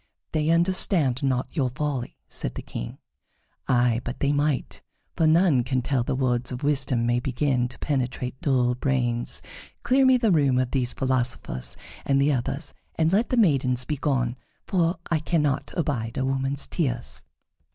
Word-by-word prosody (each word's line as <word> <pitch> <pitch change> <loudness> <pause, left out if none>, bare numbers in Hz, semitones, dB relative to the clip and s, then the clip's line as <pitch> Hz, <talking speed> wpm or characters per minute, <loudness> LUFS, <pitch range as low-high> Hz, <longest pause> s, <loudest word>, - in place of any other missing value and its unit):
"They 155 0 0
understand 170 - +3
not 130 -2 -1
your 135 -5 +1
folly," 135 -2 -3
said - - -5
the - - -6
King. - - -6 0.7
"Ay, 120 -2 +3
but 120 - -5
they 140 - +2
might, 145 -1 -1 0.3
for 160 - +3
none 160 -5 +4
can 130 0 -1
tell 130 -3 +1
when 130 +1 -2
words 125 -2 0
of 125 +3 -5
wisdom 135 -5 +1
may 120 +1 +2
begin 125 0 0
to 125 - -12
penetrate 130 -2 -2
dull 125 -3 +2
brains. 125 -2 -1 0.4
Clear 260 +2 +4
me 260 -1 +6
the 230 -4 +2
room 140 -6 +3
of 130 -1 0
these 125 -3 0
philosophers 125 - -2 0.3
and 135 0 +2
the 145 +2 +3
others, 140 +4 -3 0.2
and 160 +2 +2
let 220 +4 +2
the 255 - 0
maidens 135 - +2
begone, 130 -4 -1 0.3
for 175 -1 +1 0.2
I 165 - +3
cannot 150 -3 0
abide 125 -7 -2
a 130 - 0
woman's 135 +1 0
tears." 125 -8 -2
135 Hz, 160 wpm, -25 LUFS, 125-150 Hz, 0.7 s, me